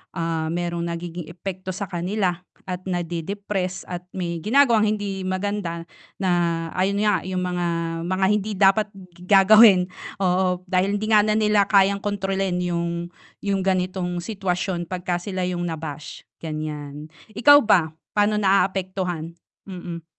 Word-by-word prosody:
ah, 165 -2 -1
merong 170 +1 -2
nagiging 170 0 -5
epekto 185 +2 -6
sa 195 0 -5
kanila, 180 0 -1 0.3
at 180 +1 -5
na-de-depress, 185 +2 -3
at 180 0 -5
may 170 -2 -3
ginagawang 225 - +4
hindi 200 -2 -4
maganda, 185 -2 -2 0.4
na 190 - +1 0.5
ayun 200 +2 +1
nga 210 -3 +1
yung 185 -1 -2
mga 180 -1 -2 0.4
mga 185 +2 +1
hindi 210 0 0
dapat 195 +2 +4 0.3
gagawin, 195 0 +6 0.3
oo, 180 -1 +1
dahil 190 +2 +1
hindi 215 - -3
nga 210 -1 +5
na 215 - +2
nila 210 -1 +3
kayang 200 0 +4
kontrolin 195 -2 -1
yung 170 -1 -2 0.3
yung 195 -2 -1
ganitong 185 -1 -1
sitwasyon 185 -2 -2
'pag 180 +1 -5
ka 175 -1 -1
sila 185 +1 -4
yung 175 -1 -2
na-bash, 155 -3 -6 0.2
gan'yan, 155 -1 -6 0.2
ikaw 285 +7 +7
ba, 175 -7 +4 0.2
paano 210 0 +2
naapektuhan? 185 -4 0 0.3
Mm. 175 -3 -7
185 Hz, 135 wpm, -23 LUFS, 175-200 Hz, 0.5 s, ikaw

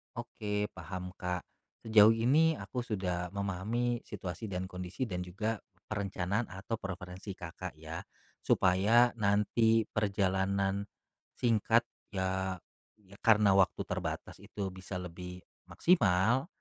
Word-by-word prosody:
Oke, 105 0 -3
paham, 90 -1 -6
Kak. 90 -2 -2 0.4
Sejauh 110 -1 +7
ini 150 +8 +4
aku 125 - -5
sudah 90 -5 -2
memahami 105 +5 -1
situasi 100 +2 -5
dan 90 -1 -3
kondisi 90 +6 -5
dan 90 -7 -3
juga 105 +5 -2 0.3
perencanaan 100 +1 -1
atau 95 +5 -5
preferensi 95 0 -6
Kakak 85 0 -7
ya, 80 +2 -7 0.4
supaya 105 +7 +4
nanti 110 +2 +3
perjalanan 100 -1 +1 0.5
singkat 115 0 +3 0.3
ya, 95 -1 -1 0.4
ya 100 -1 -17
karena 105 -3 +5
waktu 95 -1 +3
terbatas - - -4
itu 100 -2 -4
bisa 95 +1 -8
lebih 90 +1 -8 0.2
maksimal, 120 - +3
100 Hz, 110 wpm, -32 LUFS, 90-110 Hz, 0.5 s, Sejauh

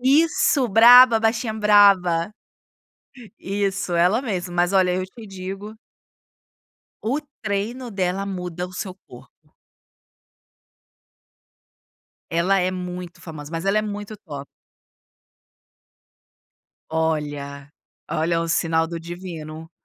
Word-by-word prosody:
Isso, 295 0 +3
braba, 235 +2 +8
baixinha 225 0 0
braba. 200 -5 +4 1.1
Isso, 195 -2 -2
ela 180 +7 +3
mesma. 190 -8 -4
Mas, 175 +1 +1
olha, 185 -2 +3
eu 185 0 -1
te 225 +4 -13
digo 195 +3 -8 1.2
o 260 +7 -1 0.2
treino 225 +4 -3
dela 190 0 -1
muda 180 -2 -5
o 180 - -14
seu 185 0 -5
corpo. 125 0 -17 2.8
Ela 175 +4 +2
é 180 +1 0
muito 180 -1 -7
famosa, 155 -3 -9
mas 165 +1 -4
ela 195 +2 +2
é - - 0
muito 205 0 -6
top. 145 -9 -9 2.4
Olha, 145 -3 -3 0.4
olha, 165 +2 0
é - - +1
um 165 - -3
sinal 165 -1 +1
do 170 0 -6
divino, 165 -2 -8
185 Hz, 105 wpm, -22 LUFS, 165-210 Hz, 2.8 s, braba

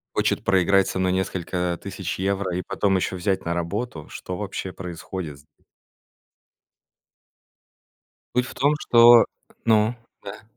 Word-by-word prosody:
Хочет - - 0
проиграть 95 0 +3
со - - -3
мной 95 0 +1
несколько, 90 -1 -2
а, - - -3
тысяч 95 -2 -5
евро 95 -1 -1
и 90 - -2
потом 100 -2 +1
ещё 95 0 -1
взять 95 +1 -1
на 85 - 0
работу. 85 0 -4
Что 90 - -6
вообще 100 -2 -5
происходит 85 -3 -7
зде 75 +2 -26 2.7
Суть 125 0 +2
в - - -10
том, 145 +3 +2
что 120 0 +7 0.4
ну, 110 +1 +4 0.3
да. 100 +2 -9
95 Hz, 135 wpm, -24 LUFS, 90-100 Hz, 2.7 s, что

